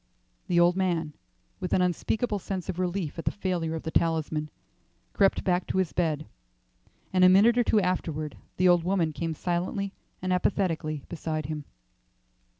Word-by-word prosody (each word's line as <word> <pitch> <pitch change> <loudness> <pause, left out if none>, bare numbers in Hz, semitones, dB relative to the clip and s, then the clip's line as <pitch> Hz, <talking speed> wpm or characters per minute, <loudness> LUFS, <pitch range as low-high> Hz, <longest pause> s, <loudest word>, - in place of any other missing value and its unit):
The 175 -1 +3
old 175 +1 +5
man, 170 -5 0 0.5
with 180 - -3
an 185 - +4
unspeakable 205 +5 0
sense 190 -1 -5
of 180 -1 -3
relief 180 -3 -2
at - - -5
the - - +2
failure 175 -5 -2
of 160 - -5
the 160 - -4
talisman, 160 -2 0 0.6
crept 195 -1 +3
back 180 -1 +1
to - - -2
his 185 -3 +1
bed, 155 -4 0 0.9
and 185 0 +4
a 185 - +9
minute 205 +6 +6
or 245 - +4
two 220 - +3
afterward 160 -6 -2 0.2
the 185 - +4
old 175 -2 +5
woman 175 -3 +1
came 165 0 -3
silently 185 +4 -2 0.3
and 185 0 -1
apathetically 165 -6 0
beside 155 -2 -3
him. 150 0 -5
175 Hz, 165 wpm, -27 LUFS, 160-185 Hz, 0.9 s, a